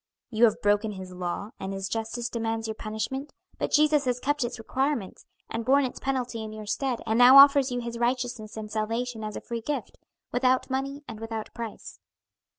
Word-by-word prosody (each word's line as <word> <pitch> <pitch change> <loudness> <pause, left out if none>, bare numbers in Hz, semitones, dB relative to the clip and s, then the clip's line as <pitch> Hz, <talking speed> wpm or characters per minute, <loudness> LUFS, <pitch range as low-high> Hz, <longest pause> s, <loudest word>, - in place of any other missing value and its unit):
"You 230 +1 +5
have 220 - +1
broken 205 +1 +2
His 190 -1 -8
law, 180 +3 -4
and 190 - -4
His 195 0 -3
justice 225 +2 -3
demands 225 -1 -2
your 220 - -2
punishment; 220 +6 -4 0.3
but - - -1
Jesus 300 -1 +4
has 250 -1 0
kept 290 +1 0
its 240 +1 -3
requirements, 255 -2 -2 0.2
and 230 - -3
borne 275 +3 +4
its 250 - -5
penalty 250 -4 -2
in 215 - -6
your 215 0 -8
stead, 245 +3 -1
and 225 +1 +1
now 250 +2 +9
offers 275 -1 +8
you 245 0 -1
his 235 0 -5
righteousness 240 -3 -1
and 215 -1 -6
salvation 225 +2 -2
as 215 -1 -5
a - - -5
free 235 -1 -5
gift, 290 +5 -4 0.3
'without 255 +1 +2
money 275 +2 -2
and 220 -2 -8
without 225 -1 -5
price.'" 230 -2 -7
235 Hz, 195 wpm, -27 LUFS, 220-260 Hz, 0.3 s, now